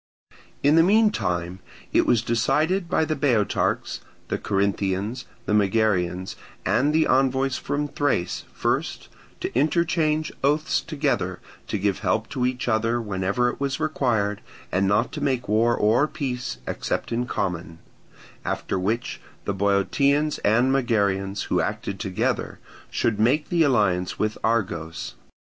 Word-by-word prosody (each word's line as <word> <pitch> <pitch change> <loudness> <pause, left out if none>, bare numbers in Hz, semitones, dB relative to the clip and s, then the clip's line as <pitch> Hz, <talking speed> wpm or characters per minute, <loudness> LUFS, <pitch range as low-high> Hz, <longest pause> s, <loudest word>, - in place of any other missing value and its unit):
In 145 +1 +5
the - - +8
meantime 95 - +2 0.3
it - - +3
was 115 -2 +3
decided 155 - +1
by 160 - +2
the 155 - -1
Boeotarchs, 125 -8 0 0.3
the - - -1
Corinthians, 100 +3 -1 0.2
the 105 - 0
Megarians, 95 -3 +1 0.3
and 145 +4 +2
the 155 +1 +3
envoys 135 0 +2
from 145 +1 -2
Thrace 140 -11 -1
first - - -2 0.3
to - - -3
interchange 155 +1 +1
oaths 150 +3 +2
together 135 - -1 0.3
to - - -1
give 100 -2 0
help 110 0 0
to 125 -3 0
each 125 -1 -3
other 115 +1 +1
whenever 100 +3 0
it - - -6
was 140 -1 -1
required 110 -9 0 0.3
and 95 +1 +2
not 105 +6 +2
to 150 0 -6
make 130 -4 0
war 115 +3 +3
or 115 +8 +3
peace 125 -5 -4
except - - -3
in 120 +1 -1
common; 85 -6 -3 0.7
after - - -2
which 110 +6 -2 0.2
the 100 - -1
Boeotians 140 +10 +2
and 120 +5 +3
Megarians, 100 -7 +1
who - - +1
acted 100 -1 -3
together, 95 -4 -1 0.3
should 110 -3 0
make 130 +8 +2
the 170 -1 +2
alliance 100 - +2
with 110 0 0
Argos. 90 -7 -1
115 Hz, 135 wpm, -24 LUFS, 100-140 Hz, 0.7 s, the